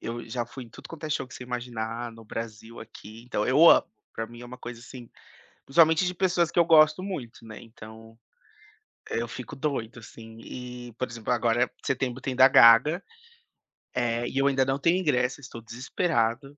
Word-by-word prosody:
eu 115 0 -6
já 120 +1 -3
fui 125 +2 -10
em - - -16
tudo - - -13
quanto 165 -1 -9
é 155 - -4
show 145 - -1
que - - -15
você 125 - -9
imaginar, 120 -1 -5
no 115 0 -14
Brasil, 115 +1 -8
aqui. 110 0 -12
Então, 120 -4 -2
eu 150 +6 +7
amo, - - +5 0.3
pra 115 - -4
mim 120 +1 -13
é - - -9
uma 125 +1 -11
coisa 120 -1 -9
assim 120 0 -11 0.6
principalmente 160 +4 +4
de 180 - -1
pessoas 175 -2 +1
que - - +1
eu 170 - +5
gosto 155 +1 +5
muito, 145 - -7
né. 110 -1 -10
Então, 110 0 -14 0.9
eu 115 - -2
fico 125 +4 -8
doido, 130 -5 -3
assim. 115 0 -13
E, 125 0 -9
por 130 - -2
exemplo, 115 0 -5
agora, 120 0 +2
eh, - - -3 0.2
setembro 130 -2 -2
tem 130 -1 -3
da 130 +1 +7
Gaga. 125 +10 +6 0.9
É. 120 -1 -1
E 135 - -5
eu 135 - +3
ainda 135 -1 +2
não 135 +1 0
tenho 170 +5 +2
ingresso, 130 -7 0
estou 120 -4 -10
desesperado. 125 +2 -2
125 Hz, 195 wpm, -26 LUFS, 115-140 Hz, 0.9 s, eu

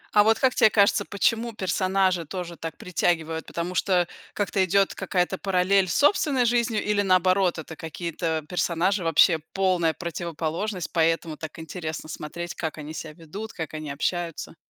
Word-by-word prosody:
А 210 - +8
вот 220 +1 +4
как 260 -1 +2
тебе 220 - +5
кажется, 200 -1 +3
почему 230 +3 0
персонажи 185 -2 +1
тоже 175 0 -6
так 165 -1 -7
притягивают? 165 -2 -1
Потому 170 +2 -4
что 180 -2 +2 0.3
как-то 200 -1 +1
идет 195 +2 +2
какая-то 185 +1 -1
параллель 190 0 +2
с 170 - -1
собственной 285 -4 +3
жизнью 235 -2 +1
или, 210 -1 +1
наоборот, 185 -1 +3
это 160 0 -7
какие-то 160 -1 -3
персонажи- 180 +2 0
вообще 165 +1 +5
полная 180 -4 +2
противоположность, 170 +2 -4
поэтому 165 -1 +1
так 160 -1 -8
интересно 160 -1 -6
смотреть, 170 +3 -6
как 160 -2 -4
они 155 +1 -7
себя 155 -1 -7
ведут, 185 +7 -8
как 160 -2 -6
они 155 -1 -5
общаются? 165 +3 -3
180 Hz, 155 wpm, -25 LUFS, 165-195 Hz, 0.3 s, А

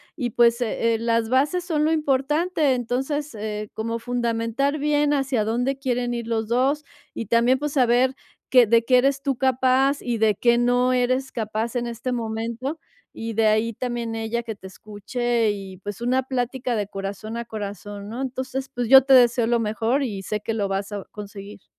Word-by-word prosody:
y, 250 -6 -2
pues, 235 +1 +3
eh, 230 0 +1
las 230 0 0
bases 290 +9 +1
son 310 -4 0
lo 310 - +2
importante. 300 +1 +1
Entonces, 265 +4 -2
eh, 210 0 -5
como 230 +1 -3
fundamentar 240 +3 -1
bien 295 0 +2
hacia 270 -5 0
dónde 245 +5 -1
quieren 250 -3 -1
ir 235 -1 -4
los 225 -1 -1
2, 270 +6 +1 0.3
y 230 - -5
también, 235 +4 +3
pues, 295 0 -3
saber 255 0 +3 0.3
que 250 -2 +6
de 230 +1 +3
qué 255 0 +5
eres 275 +1 +1
tú 275 -3 -1
capaz 260 +2 +2
y 240 -2 -2
de 215 -1 +3
qué 235 +4 +3
no 245 +1 +2
eres 255 +1 0
capaz 220 +1 -3
en 240 -1 -1
este 235 +2 -4
momento, 235 +5 -3 0.4
y 225 0 -4
de 220 0 +3
ahí 215 +2 +2
también 235 0 -4
ella 225 +1 -2
que 225 -2 -5
te 190 -1 -11
escuche 220 +4 -2
y, 195 -2 -7
pues, 205 +3 -7
una 255 +2 +1
plática 255 -1 -2
de 205 -2 -2
corazón 200 +3 -6
a 235 - -4
corazón, 205 -1 -7
¿no? 235 +4 -5
Entonces, 260 0 -4
pues, 245 -4 -4
yo 265 0 +9
te 270 - +5
deseo 240 -2 +5
lo 235 0 +2
mejor 225 +5 0
y 205 -7 -4
sé 210 +2 -3
que 225 - -3
lo 205 -3 -1
vas 195 +1 -3
a 205 -1 -5
conseguir. 205 -1 -10
240 Hz, 190 wpm, -23 LUFS, 220-260 Hz, 0.4 s, yo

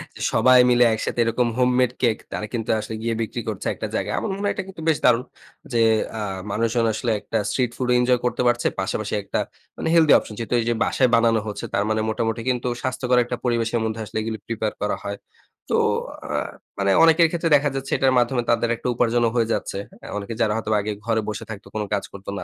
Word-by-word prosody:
যে - - -10
সবাই 130 0 +6
মিলে 120 0 +5
একসাথে 110 - -3
এরকম 115 +1 +1
হোমমেড 125 0 +3
কেক 115 -3 +2
তারা 105 - -3
কিন্তু 115 -2 -3
আসলে 110 +1 -5
গিয়ে 115 0 -1
বিক্রি 110 - -3
করছে - - -4
একটা - - -5
জায়গায়। - - -1
আমার - - -3
মনে 200 - -5
হয় - - +2
এটা 190 - -3
কিন্তু 185 -4 -10
বেশ 155 - +3
দারুণ, 125 0 +4 0.5
যে 115 - +2 0.4
আ - - -3 0.3
মানুষজন 115 +2 +1
আসলে 115 +2 -1
একটা - - -3
স্ট্রিট 125 -3 0
ফুডও 125 -1 +1
এনজয় 125 0 +3
করতে 125 - 0
পারছে। 120 0 +2
পাশাপাশি 105 +2 -2
একটা - - -2 0.4
মানে - - -3
হেলথি 160 -3 +6
অপশন, 105 - -5
যেহেতু 115 +1 -3
এইযে 120 +1 0
বাসায় 130 -2 +2
বানানো 115 -1 +3
হচ্ছে। 105 - -5
তার 100 - +2
মানে 110 0 +1
মোটামুটি 115 0 -1
কিন্তু 125 0 -1
স্বাস্থ্যকর 125 -1 0
একটা 125 +1 -4
পরিবেশের 115 -1 +1
মধ্যে 110 0 -3
আসলে 110 - -6
এগুলি 110 0 -3
প্রিপেয়ার 110 -2 -2
করা 105 - 0
হয়। 100 0 -4 0.5
তো - - +3 0.5
আ - - -3 0.5
মানে 100 0 +2
অনেকের 165 0 +6
ক্ষেত্রে 165 -1 -1
দেখা 145 0 +3
যাচ্ছে 135 0 -4
এটার 130 -1 +3
মাধ্যমে 120 0 +2
তাদের 120 0 +2
একটা 120 - -6
উপার্জনও 120 -1 +2
হয়ে 115 -2 +2
যাচ্ছে। - - -3 0.2
হ্যাঁ? - - -10
অনেকে 105 +3 -5
যারা 110 -2 +2
হয়তো 110 -1 -3
আগে 105 +1 -3
ঘরে 110 -1 +1
বসে 105 - -4
থাকতো, 110 -1 -8
কোনো 105 -1 -1
কাজ 100 - 0
করতো 100 0 -9
না, - - -5
115 Hz, 215 wpm, -23 LUFS, 110-125 Hz, 0.5 s, সবাই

